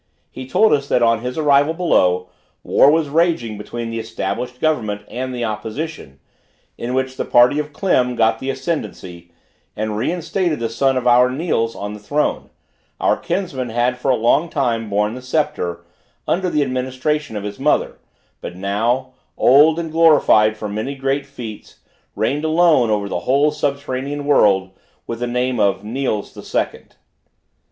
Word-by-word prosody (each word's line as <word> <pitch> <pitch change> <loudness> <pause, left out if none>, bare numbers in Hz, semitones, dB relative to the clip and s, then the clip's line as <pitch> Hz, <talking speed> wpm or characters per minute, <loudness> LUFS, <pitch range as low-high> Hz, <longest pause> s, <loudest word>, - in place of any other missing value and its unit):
He 130 -1 -8
told 220 +11 +4
us 140 -1 0
that 125 - +2
on 115 -1 +3
his 125 +3 -5
arrival 145 +1 +3
below, 90 - +2 0.3
war 140 - +5
was 155 0 +2
raging 155 -7 +1
between 115 +2 -6
the 115 - -3
established 115 +3 -4
government 110 -10 -1
and 130 +1 -5
the 120 -2 -3
opposition, 110 - -6 0.6
in 125 +2 -4
which 130 0 -2
the - - -1
party 125 +4 +4
of 150 0 -4
Klim 130 -7 +1
got 115 -1 +2
the 135 - -4
ascendancy, 130 - -5 0.5
and 110 0 -3
reinstated 170 - -1
the 115 -1 -2
son 135 +3 +1
of 125 - -2
our 125 +1 +5
Niels 130 -5 -1
on 105 +1 -5
the 105 - -9
throne; 145 +9 -1 0.5
our - - +2
kinsman 150 -11 -3
had 120 +2 0
for 135 - -1
a 130 - +4
long 125 +8 +2
time 115 -7 -1
borne 105 +1 0
the 125 - -8
sceptre, 125 - -2 0.4
under 185 +1 0
the 150 -3 +1
administration 130 +1 -2
of 105 - -4
his 105 +2 -6
mother; 150 +3 0 0.4
but 90 - -7
now, 115 +7 -1 0.2
old 150 +5 +5
and 165 -2 -4
glorified 150 -10 +4
for 105 - -5
many 110 +7 -4
great 135 +1 -2
feats, 120 -6 -9 0.4
reigned 145 +4 -1
alone 160 -6 +3
over 105 -2 0
the 95 - -3
whole 140 +3 +4
subterranean 140 0 -3
world, 95 -9 +3 0.3
with 115 -1 -5
the 120 - -2
name 125 0 -1
of 100 -1 +1
Niels 110 -2 -3
the - - -10
Second. - - -4
125 Hz, 165 wpm, -19 LUFS, 110-145 Hz, 0.6 s, war